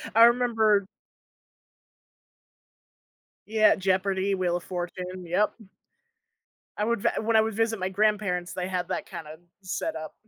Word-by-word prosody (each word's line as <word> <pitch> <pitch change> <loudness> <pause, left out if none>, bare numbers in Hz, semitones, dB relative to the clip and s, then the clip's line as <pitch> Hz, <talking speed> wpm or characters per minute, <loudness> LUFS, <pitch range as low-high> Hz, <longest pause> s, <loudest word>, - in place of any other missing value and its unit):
I 230 - +8
remember 225 -4 +3 2.6
Yeah, 215 0 +4
Jeopardy, 190 0 0
Wheel 180 -2 0
of 175 - -10
Fortune, 180 0 -5
yup. 180 +5 +1 1.2
I 210 - 0
would 235 -2 0
vi - - +2
when 225 +1 0
I 220 - +7
would 220 0 -1
visit 225 0 0
my 185 0 -1
grandparents, 195 -3 0
they 185 0 -3
had 180 -2 -2
that - - -3
kinda 155 -1 -9 0.2
set 200 - -3
up. 155 - -7
195 Hz, 135 wpm, -26 LUFS, 180-220 Hz, 2.6 s, I